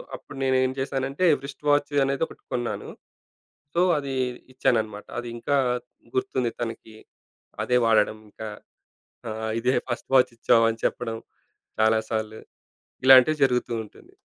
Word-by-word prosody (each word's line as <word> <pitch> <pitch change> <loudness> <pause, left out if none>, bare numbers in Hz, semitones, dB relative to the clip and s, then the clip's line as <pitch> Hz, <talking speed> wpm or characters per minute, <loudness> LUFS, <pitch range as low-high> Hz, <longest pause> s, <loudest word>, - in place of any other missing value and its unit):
అప్పుడు 140 - -12
నేనేం 130 0 +2
చేశానంటే 135 +4 -1 0.2
వ్రి‌ష్ట్ 140 +1 -9
వాచ్ 145 0 +2
అనేది 140 +3 0
ఒకటి 415 - -16
కొన్నాను. - - -3 0.9
సో, 175 - +3 0.2
అదీ 140 -2 -3 0.4
ఇచ్చాననమాట. 110 -5 0
అదింకా 120 +4 -2 0.6
గుర్తుంది 385 - 0
తనకి. 115 -1 -6 0.7
అదే 125 - +2
వాడడం 110 -1 +3
ఇంక. - - -16 0.9
ఆహ్, 110 0 -3
ఇదే 125 +2 +2
ఫస్ట్ 120 - -4
వాచిచ్చావు 115 -2 +4
అని 115 - -6
చెప్పడం 115 -2 -1 0.6
చాలా 110 0 +4
సాల్లు. 110 0 -3 0.7
ఇలాంటివి 135 +4 +8
జరుగుతూ 125 -2 0
ఉంటుంది. - - -18
125 Hz, 120 wpm, -25 LUFS, 110-135 Hz, 0.9 s, ఇలాంటివి